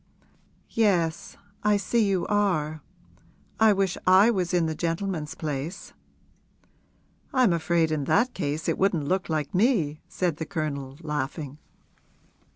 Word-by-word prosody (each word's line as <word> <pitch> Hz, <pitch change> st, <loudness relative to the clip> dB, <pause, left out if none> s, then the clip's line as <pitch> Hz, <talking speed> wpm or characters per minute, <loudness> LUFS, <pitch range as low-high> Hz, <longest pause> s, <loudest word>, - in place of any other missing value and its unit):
'Yes; 175 Hz, -7 st, +1 dB, 0.3 s
I 210 Hz, 0 st, +4 dB
see 230 Hz, +3 st, +1 dB
you 195 Hz, -4 st, +1 dB
are. 165 Hz, -7 st, 0 dB, 0.8 s
I 220 Hz, -1 st, +6 dB
wish 195 Hz, -2 st, 0 dB
I 190 Hz, +5 st, +7 dB
was 185 Hz, -5 st, -1 dB
in 175 Hz, -2 st, +2 dB
the 160 Hz, -, -1 dB
gentleman's 165 Hz, -1 st, -3 dB
place.' 150 Hz, +2 st, -5 dB, 1.4 s
'I'm 255 Hz, -8 st, +4 dB
afraid 165 Hz, -1 st, +1 dB
in 150 Hz, -3 st, -1 dB
that 245 Hz, -, +2 dB
case 155 Hz, -2 st, -3 dB
it -, -, 0 dB
wouldn't 175 Hz, -7 st, +1 dB
look 185 Hz, +2 st, 0 dB
like 155 Hz, -3 st, -2 dB
me,' 180 Hz, -, +2 dB
said 175 Hz, -5 st, -1 dB
the 160 Hz, -, -4 dB
Colonel, 140 Hz, -4 st, -4 dB
laughing. 150 Hz, -1 st, -4 dB
170 Hz, 130 wpm, -26 LUFS, 155-195 Hz, 1.4 s, I